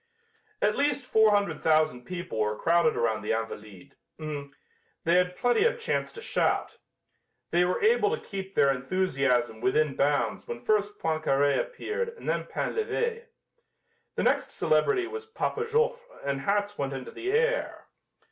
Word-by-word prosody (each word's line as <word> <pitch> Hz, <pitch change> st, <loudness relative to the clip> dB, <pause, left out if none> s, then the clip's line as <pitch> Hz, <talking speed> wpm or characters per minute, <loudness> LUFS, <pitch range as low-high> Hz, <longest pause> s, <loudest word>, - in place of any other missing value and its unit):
At 210 Hz, +1 st, +3 dB
least 285 Hz, -2 st, 0 dB
four 220 Hz, -3 st, +5 dB
hundred 200 Hz, -7 st, +1 dB
thousand 155 Hz, -6 st, +2 dB
people 175 Hz, -11 st, -5 dB
were 105 Hz, 0 st, 0 dB
crowded 170 Hz, -2 st, +3 dB
around 110 Hz, -2 st, 0 dB
the 105 Hz, -, -1 dB
"Invalides." 105 Hz, -4 st, -6 dB, 0.2 s
They 150 Hz, +2 st, -6 dB
had 180 Hz, 0 st, +3 dB
plenty 245 Hz, -, +2 dB
of 480 Hz, +2 st, +2 dB
chance 465 Hz, -, -2 dB
to 460 Hz, -, -9 dB
shout. -, -, 0 dB, 0.7 s
They 175 Hz, +1 st, +4 dB
were 180 Hz, -, 0 dB
able 435 Hz, -1 st, +4 dB
to 460 Hz, +2 st, -3 dB
keep 195 Hz, -1 st, -6 dB
their 140 Hz, -, +5 dB
enthusiasm 130 Hz, -6 st, 0 dB
within 140 Hz, +3 st, +2 dB
bounds 140 Hz, -5 st, 0 dB
when 120 Hz, 0 st, -7 dB
first 205 Hz, -1 st, +1 dB
Poincaré 145 Hz, -3 st, +1 dB
appeared 475 Hz, -1 st, -3 dB
and -, -, -10 dB
then -, -, 0 dB
Painlevé. 465 Hz, +1 st, -2 dB, 0.9 s
The -, -, 0 dB
next -, -, +2 dB
celebrity 385 Hz, -4 st, +2 dB
was 445 Hz, +3 st, -7 dB
Papa 450 Hz, +1 st, -2 dB
Joffre 470 Hz, +2 st, +1 dB, 0.3 s
and 140 Hz, -1 st, -1 dB
hats 205 Hz, +4 st, 0 dB
went 140 Hz, -1 st, -1 dB
into 130 Hz, -1 st, -6 dB
the 375 Hz, +2 st, -3 dB
air. 475 Hz, +3 st, 0 dB
180 Hz, 150 wpm, -28 LUFS, -, 0.9 s, four